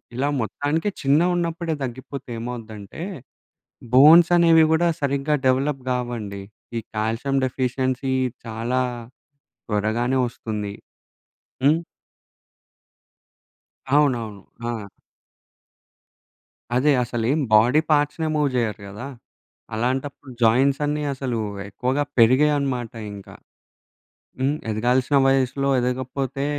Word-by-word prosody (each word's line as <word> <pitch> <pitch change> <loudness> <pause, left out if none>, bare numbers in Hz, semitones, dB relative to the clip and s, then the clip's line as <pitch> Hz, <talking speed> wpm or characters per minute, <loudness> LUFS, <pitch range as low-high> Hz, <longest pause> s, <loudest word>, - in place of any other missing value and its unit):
ఇలా 135 +3 0
మొత్తానికి 145 - -1
చిన్నగున్నప్పుడే 170 +3 +1
తగ్గిపోతే 130 +1 -7
ఏమవుద్దంటే, 115 -1 -7 0.9
బోన్సనేవి 165 +3 +7
గూడా 170 +2 +3
సరిగ్గా 140 +1 0
డెవలప్ 135 +1 +1
గావండి. 120 -6 -3 0.4
ఈ - - -2 0.2
కాల్షియం 115 +6 -1
డెఫిషియన్సీ 130 +1 -1 0.3
చాలా 115 +3 -1 0.9
త్వరగానే 110 +5 0
వస్తుంది. 105 -3 -5 0.9
హ్మ్. 150 +4 +4 2.2
అవునవును. 120 -8 +1 0.3
ఆ! 115 -2 -3 1.9
అదే. 145 +4 +4
అసలేం 120 +5 -1 0.2
బాడీ 120 +8 +5
పార్ట్స్‌నే 150 +2 +1
మూవ్ 150 -1 +2
చేయరు 115 -3 -1
గదా! 105 +7 -8 0.7
అలాంటప్పుడు 130 +4 -3
జాయింట్స్ 135 +5 +3
అన్నీ 150 0 -1
అసలు 130 -3 -3 0.3
ఎక్కువగా 130 +8 -1 0.2
పెరిగాయనమాట 130 0 +3 0.2
ఇంక. 100 -1 -11 1.1
హ్మ్. 135 +3 +1 0.2
ఎదగాల్సిన 125 +5 +1
వయసులో 135 +1 +1
ఎదగపోతే 130 +2 -2
130 Hz, 85 wpm, -23 LUFS, 115-145 Hz, 2.2 s, బోన్సనేవి